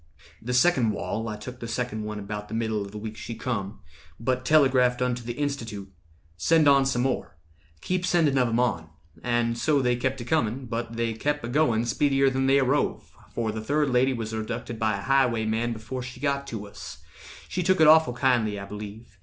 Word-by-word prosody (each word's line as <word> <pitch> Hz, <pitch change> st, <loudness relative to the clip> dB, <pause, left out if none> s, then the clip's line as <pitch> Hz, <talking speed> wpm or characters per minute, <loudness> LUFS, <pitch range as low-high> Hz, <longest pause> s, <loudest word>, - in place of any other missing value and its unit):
"The 125 Hz, +2 st, -2 dB
second—wall, 115 Hz, -6 st, +1 dB
I 105 Hz, -, -5 dB
took 125 Hz, +4 st, -9 dB
the 115 Hz, -, -6 dB
second 115 Hz, -3 st, -3 dB
one 105 Hz, 0 st, -5 dB
About 105 Hz, +1 st, -6 dB
the 110 Hz, -, -5 dB
middle 110 Hz, -2 st, -1 dB
of 100 Hz, -, -9 dB
the 105 Hz, -, -8 dB
week 110 Hz, +1 st, -6 dB
she 115 Hz, -, -7 dB
come; 110 Hz, -4 st, -4 dB, 0.4 s
But 125 Hz, +2 st, -1 dB
telegraphed 130 Hz, -5 st, +4 dB
unto 125 Hz, -1 st, -1 dB
the 120 Hz, 0 st, -5 dB
Institute, 115 Hz, -9 st, -4 dB, 0.5 s
'Send 160 Hz, -, +3 dB
on 140 Hz, -1 st, +5 dB
some 125 Hz, -2 st, 0 dB
more; 130 Hz, -9 st, -2 dB, 0.4 s
keep 185 Hz, 0 st, -1 dB
sending 165 Hz, -6 st, +2 dB
of 125 Hz, -, +3 dB
'em 115 Hz, +1 st, 0 dB
on.' 95 Hz, -10 st, 0 dB, 0.3 s
And 120 Hz, -1 st, 0 dB
so 150 Hz, +1 st, +2 dB
they 125 Hz, -2 st, +2 dB
kept 130 Hz, +2 st, -2 dB
a 120 Hz, -, -6 dB
comin', 130 Hz, -3 st, 0 dB
but 115 Hz, 0 st, -4 dB
they 115 Hz, -1 st, -1 dB
kep' 145 Hz, +6 st, -2 dB
A -, -, -3 dB
going 120 Hz, -4 st, +2 dB
speedier 135 Hz, +2 st, +2 dB
than 135 Hz, 0 st, 0 dB
they 135 Hz, +1 st, +5 dB
arrove, 135 Hz, +2 st, 0 dB, 0.2 s
For 115 Hz, -2 st, -1 dB
the 110 Hz, 0 st, -5 dB
third 145 Hz, +4 st, +1 dB
lady 125 Hz, +2 st, +3 dB
was 115 Hz, -2 st, -4 dB
abducted 115 Hz, +1 st, -4 dB
by 110 Hz, -2 st, +1 dB
A -, -, -6 dB
highwayman 120 Hz, -3 st, +1 dB
before 115 Hz, +3 st, -5 dB
she 125 Hz, 0 st, -8 dB
got 140 Hz, -1 st, -1 dB
to 110 Hz, -5 st, -5 dB
us— 100 Hz, -, -10 dB, 0.4 s
She 180 Hz, -, -2 dB
took 185 Hz, 0 st, +2 dB
it 160 Hz, -, +7 dB
awful 155 Hz, -4 st, +6 dB
kindly, 120 Hz, -5 st, +1 dB
I 100 Hz, -, -6 dB
believe. 105 Hz, +1 st, -9 dB
120 Hz, 205 wpm, -26 LUFS, 110-135 Hz, 0.5 s, it